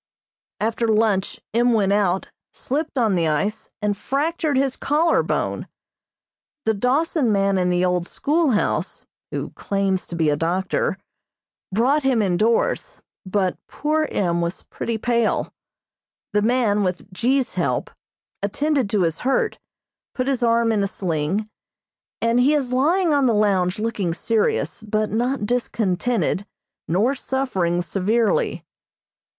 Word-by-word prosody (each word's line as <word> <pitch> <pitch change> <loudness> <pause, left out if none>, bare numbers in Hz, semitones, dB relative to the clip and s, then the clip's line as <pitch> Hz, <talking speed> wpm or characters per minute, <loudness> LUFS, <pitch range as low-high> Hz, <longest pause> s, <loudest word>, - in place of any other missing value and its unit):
After 225 +2 0
lunch 215 -3 +1
M. 240 +1 +3
went 200 -3 +2
out, 195 -2 +1 0.2
slipped 290 +2 -3
on 225 -5 +3
the 170 -3 +1
ice 200 +8 -1
and 205 -1 +1
fractured 295 - -1
his 270 -1 +1
collar 320 +3 +2
bone. - - -2 1.0
The 220 - +3
Dawson 255 - +1
man 195 -1 +2
in 180 0 +1
the 180 0 +2
old 180 -1 0
schoolhouse, 295 -7 0 0.2
(who - - -4
claims 195 -2 -1
to 175 - -6
be 160 -2 +2
a - - +2
doctor), 175 +5 -1 0.7
brought 255 +9 +2
him 260 -5 +2
indoors, 225 - 0 0.2
but 185 -1 0
poor 310 +1 0
M. 170 -3 0
was 170 +1 -3
pretty 230 -1 -4
pale. 235 0 0 0.8
The 210 - +3
man, 220 -2 +2
with 185 +1 -3
G.'s 255 +6 +1
help, - - -1 0.5
attended 275 +3 0
to 205 -3 +2
his 165 -2 -1
hurt, 430 - 0 0.6
put 255 -1 -1
his 265 -2 0
arm 230 -1 +3
in 215 -2 +1
a 200 - +1
sling, 185 +2 -2 0.8
and 230 +1 +3
he 280 +5 +4
is 260 -4 -1
lying 325 +6 +3
on 280 -2 +3
the 230 - +2
lounge 195 -3 +2
looking 210 -6 -1
serious, 220 +4 0
but 215 0 -1
not 240 +1 0
discontented 215 -3 0 0.4
nor 205 +11 +2
suffering 195 -11 -1
severely. 210 +5 0
220 Hz, 135 wpm, -22 LUFS, 190-260 Hz, 1.0 s, he